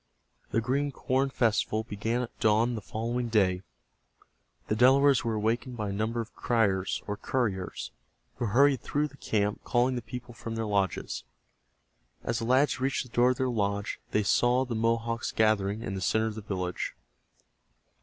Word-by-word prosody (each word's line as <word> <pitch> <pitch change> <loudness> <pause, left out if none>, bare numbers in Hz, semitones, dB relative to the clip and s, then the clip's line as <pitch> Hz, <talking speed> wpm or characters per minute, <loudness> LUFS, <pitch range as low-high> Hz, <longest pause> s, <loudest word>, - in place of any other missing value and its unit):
The 115 - +1
Green 140 +4 0
Corn 135 0 0
Festival 110 -3 +1
began 110 +3 -2
at 120 - -9
dawn 110 +3 +3
the 110 - -4
following 120 +4 -2
day. 95 -5 +2 1.0
The 105 - 0
Delawares 135 +3 +5
were 115 -1 -1
awakened 115 +3 -1
by 105 -2 -2
a - - -3
number 110 +3 -1
of 115 0 -5
criers, 100 -6 0
or 105 - -3
couriers, 105 -5 -2 0.5
who - - -1
hurried 135 +5 +4
through 150 0 -1
the 140 - -17
camp 105 -4 -1
calling 125 +1 +2
the 125 - -2
people 120 +1 -8
from 115 -1 -6
their 115 0 -2
lodges. 100 -2 -1 1.0
As 115 - -1
the 115 - -3
lads 130 +3 +3
reached 135 +1 0
the 125 - -14
door 120 +2 +4
of 130 - 0
their 130 - +1
lodge 100 -4 -1
they 105 - +1
saw 120 +5 +3
the 125 - -4
Mohawks 115 +1 0
gathering 110 -1 +1
in 95 - -4
the 95 - -4
center 110 +4 +2
of 110 - -2
the 110 - -7
village. 90 -3 -3
115 Hz, 175 wpm, -29 LUFS, 105-125 Hz, 1.0 s, Delawares